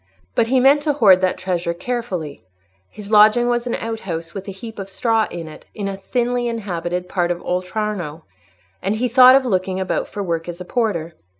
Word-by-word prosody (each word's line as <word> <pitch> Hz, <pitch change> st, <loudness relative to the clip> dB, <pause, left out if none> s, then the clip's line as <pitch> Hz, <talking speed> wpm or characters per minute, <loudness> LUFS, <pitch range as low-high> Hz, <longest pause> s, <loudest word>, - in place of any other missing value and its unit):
But 225 Hz, -, +2 dB
he 260 Hz, +2 st, +3 dB
meant 275 Hz, +3 st, +5 dB
to 295 Hz, -1 st, +1 dB
hoard 195 Hz, -9 st, +5 dB
that 185 Hz, -1 st, +1 dB
treasure 180 Hz, -2 st, -2 dB
carefully: 185 Hz, -, -4 dB, 0.5 s
his 210 Hz, 0 st, -11 dB
lodging 215 Hz, +3 st, +6 dB
was 240 Hz, 0 st, 0 dB
an 240 Hz, -, -1 dB
outhouse 175 Hz, -7 st, -5 dB
with 195 Hz, 0 st, -7 dB
a -, -, -4 dB
heap 225 Hz, +3 st, -9 dB
of 195 Hz, 0 st, -6 dB
straw 225 Hz, +2 st, +1 dB
in 170 Hz, -2 st, -7 dB
it, 155 Hz, -, -12 dB
in 205 Hz, -2 st, -3 dB
a 195 Hz, -, -3 dB
thinly 240 Hz, +4 st, -1 dB
inhabited 180 Hz, -6 st, -3 dB
part 175 Hz, -2 st, 0 dB
of 175 Hz, 0 st, -1 dB
Oltrarno, 180 Hz, -3 st, -3 dB, 0.6 s
and 195 Hz, +3 st, -1 dB
he 245 Hz, +3 st, 0 dB
thought 255 Hz, +1 st, +8 dB
of 270 Hz, -1 st, +3 dB
looking 185 Hz, -4 st, -1 dB
about 190 Hz, -, -1 dB
for 205 Hz, -, -5 dB
work 170 Hz, -2 st, -3 dB
as 175 Hz, 0 st, -7 dB
a 180 Hz, -, -7 dB
porter. 180 Hz, -8 st, -1 dB
195 Hz, 200 wpm, -20 LUFS, 180-235 Hz, 0.6 s, thought